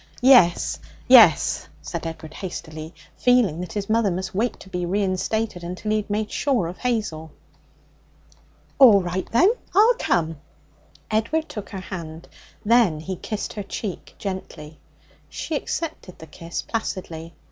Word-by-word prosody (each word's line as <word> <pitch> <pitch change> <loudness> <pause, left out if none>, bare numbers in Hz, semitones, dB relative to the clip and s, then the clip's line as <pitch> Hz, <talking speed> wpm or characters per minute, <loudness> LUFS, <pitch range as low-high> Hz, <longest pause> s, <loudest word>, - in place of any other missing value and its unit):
'Yes 245 -9 +5 0.3
yes,' - - +6
said - - -5
Edward 160 -1 -8
hastily, 160 -4 -7 0.3
feeling 245 -10 +3
that 180 - -7
his 205 -2 -3
mother 220 -1 +2
must 185 +1 -4
wait 225 +6 -1
to - - -12
be 180 -1 -3
reinstated 195 +1 -1
until 180 +5 -4
he 215 - +3
had 210 -1 -4
made 210 +1 -2
sure 260 -10 +1
of 175 +2 -7
Hazel. 210 -11 -2 1.5
'All 220 -8 +8
right, 180 +1 -4
then; 355 - +5 0.2
I'll 440 +5 +6
come.' 165 -2 0 0.7
Edward 230 +10 0
took 205 -3 -7
her 190 - -6
hand; 165 -4 -8 0.4
then 220 -8 +4
he 185 +4 -5
kissed 210 +4 -5
her 210 - -5
cheek 195 -1 -6
gently. 175 -6 -7 0.5
She - - -5
accepted 295 - -4
the 160 - -11
kiss 165 +2 -6
placidly. 170 -7 -5
190 Hz, 140 wpm, -23 LUFS, 170-225 Hz, 1.5 s, All